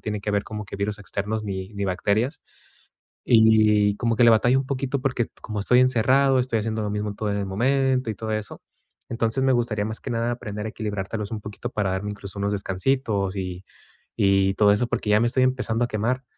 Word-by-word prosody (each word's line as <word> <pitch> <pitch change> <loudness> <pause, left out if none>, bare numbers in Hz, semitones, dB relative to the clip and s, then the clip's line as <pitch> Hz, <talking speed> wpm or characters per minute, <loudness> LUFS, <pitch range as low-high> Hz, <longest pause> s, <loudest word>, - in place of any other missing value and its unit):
tiene 105 -1 -4
que 105 - -2
ver 100 0 0
como 105 -1 -6
que 100 - -7
virus 100 +1 -2
externos 105 +2 -3
ni 95 -2 -4
ni 100 -1 -4
bacterias. 100 +7 -1 0.8
Y 110 -2 +4
como 115 -2 0
que 120 - +5
le 115 - +7
batallo 120 +4 +4
un 135 - -2
poquito 135 0 -2
porque 125 -3 0 0.2
como 105 -2 -4
estoy 125 +5 +4
encerrado, 130 +2 +3
estoy 125 -2 0
haciendo 110 0 -2
lo 105 - -2
mismo 105 0 -3
todo 105 0 -3
en 100 - -1
el 100 - -2
momento 130 +4 +1
y - - -4
todo 110 +1 -4
eso. 110 -1 -4 0.5
Entonces 115 +2 0
me 135 - +4
gustaría 115 -4 0
más 110 0 -5
que - - -6
nada 115 0 0
aprender 105 -3 -5
a - - -4
equilibrártelos 105 -1 -4
un 110 - -3
poquito 105 -1 -7
para 100 -3 -1
darme 100 +2 -3
incluso 100 -1 -8
unos 100 +1 0
descansitos 100 0 -1
y 90 -1 -5 0.5
y 95 -1 +3
todo 100 0 +5
eso, 120 +3 0
porque 105 - -2
ya 105 - +5
me 120 - +3
estoy 130 +1 +2
empezando 125 -2 0
a - - -5
quemar, 120 +5 -1
110 Hz, 215 wpm, -24 LUFS, 100-120 Hz, 0.8 s, le